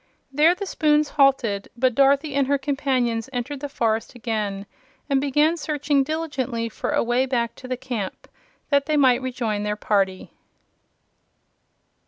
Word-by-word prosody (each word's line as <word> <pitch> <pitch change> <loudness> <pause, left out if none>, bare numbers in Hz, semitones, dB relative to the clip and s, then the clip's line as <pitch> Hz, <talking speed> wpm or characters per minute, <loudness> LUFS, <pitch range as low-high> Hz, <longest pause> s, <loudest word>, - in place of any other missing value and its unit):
There 310 +5 +5
the 400 - -5
spoons 300 -4 +2
halted; 260 -8 +2
but 255 +1 +2
Dorothy 275 +3 +3
and 280 -1 +1
her 280 0 +2
companions 265 -4 -1
entered 260 +3 -4
the 290 +1 -5
forest 225 -3 -1
again 210 -4 -3 0.4
and 275 -2 +2
began 295 +4 +2
searching 290 -2 0
diligently 270 -7 -3
for - - -5
a - - +1
way 240 +3 +1
back 235 -3 -1
to 255 - -10
the 255 0 -3
camp, 240 -7 -5 0.4
that 280 0 +3
they 305 -1 +1
might 260 -3 +4
rejoin 240 -5 -2
their 210 0 -1
party. 195 -3 -1
260 Hz, 150 wpm, -23 LUFS, 230-285 Hz, 0.4 s, There